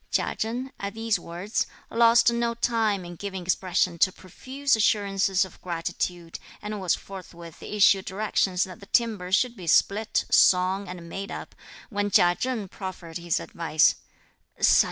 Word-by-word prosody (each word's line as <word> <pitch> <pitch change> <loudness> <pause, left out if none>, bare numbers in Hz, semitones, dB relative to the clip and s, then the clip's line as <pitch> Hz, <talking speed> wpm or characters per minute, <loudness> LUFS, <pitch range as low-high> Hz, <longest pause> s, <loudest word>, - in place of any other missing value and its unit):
Chia - - 0
Chen, 245 +4 -3
at 200 +2 -5
these 225 -1 0
words, 180 +6 -3 0.2
lost 235 0 +5
no 235 0 0
time 220 -5 0
in 175 0 -8
giving 190 -1 -5
expression 180 -1 0
to 185 - +4
profuse 260 +10 -2
assurances 195 -3 +2
of 190 - -15
gratitude, 170 0 -4 0.2
and 210 -1 -5
was 180 -3 +2
forthwith 170 -4 -11
issuing 200 -2 +3
directions 190 -2 0
that 185 -2 -8
the 200 - -14
timber 215 -7 0
should 240 +5 +2
be 180 -6 -10
split, 210 +6 +2
sawn 185 +2 +4
and 175 -2 -8
made 195 +4 -6
up, - - -7 0.4
when 205 -1 -1
Chia 175 -2 +5
Cheng 235 0 -3
proffered 180 -3 -7
his 170 -1 -1
advice. 160 -2 +2
195 Hz, 150 wpm, -26 LUFS, 180-220 Hz, 0.4 s, lost